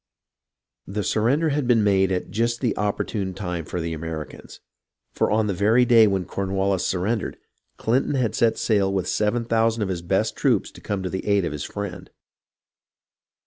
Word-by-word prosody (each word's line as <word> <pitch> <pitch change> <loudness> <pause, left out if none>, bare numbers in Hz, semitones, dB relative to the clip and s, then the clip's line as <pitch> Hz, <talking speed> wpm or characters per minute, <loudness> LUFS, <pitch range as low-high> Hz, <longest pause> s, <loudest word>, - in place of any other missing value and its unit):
The 105 +2 -3
surrender 135 +12 +1
had 145 -3 -1
been 115 -3 +4
made 95 -2 +3
at 90 -1 -2
just 115 +2 0
the 120 -6 0
opportune 100 -2 -2
time 90 -5 -4
for 90 - -4
the 85 0 -3
Americans, 80 -1 -7 0.5
for - - 0
on 110 0 +2
the 100 - -1
very 110 +7 +3
day 115 -3 +6
when 95 -2 0
Corn 95 -1 -4
wallis 95 -1 +1
surrendered, 100 +5 -1 0.4
Clinton 130 +5 +1
had 125 -5 0
set 115 -1 +2
sail 100 -3 +1
with 95 -2 -1
7000 115 0 +1
of 100 - -3
his 90 -2 -3
best 85 - 0
troops - - +1
to - - -14
come 100 -2 -3
to 95 - -2
the 95 - -4
aid 100 -3 +3
of - - -2
his 75 -1 -5
friend. 100 -3 -6
100 Hz, 180 wpm, -23 LUFS, 95-115 Hz, 0.5 s, day